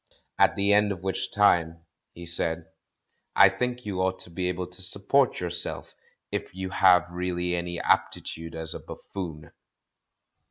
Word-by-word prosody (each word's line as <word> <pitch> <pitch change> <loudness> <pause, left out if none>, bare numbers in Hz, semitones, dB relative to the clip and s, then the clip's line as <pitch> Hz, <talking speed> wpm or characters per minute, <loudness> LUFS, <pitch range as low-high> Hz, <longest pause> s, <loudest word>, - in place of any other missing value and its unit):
"At - - +5
the 100 +1 +3
end 105 0 +4
of 95 -2 -6
which 95 0 -2
time," 85 -5 +2 0.3
he 85 - -10
said, 85 -1 +1 0.7
"I 100 - +8
think 125 +5 -3
you 95 -3 -2
ought 95 0 0
to 85 - -2
be 90 +1 -2
able 90 0 -3
to 90 +1 -7
support 100 +8 +1
yourself, 90 -1 -3 0.4
if - - -4
you 95 0 -5
have 95 -3 +5
really 90 0 -2
any 85 0 -3
aptitude 80 0 -1
as 80 0 -2
a - - -6
buffoon." 80 -6 -8
90 Hz, 155 wpm, -26 LUFS, 85-95 Hz, 0.7 s, I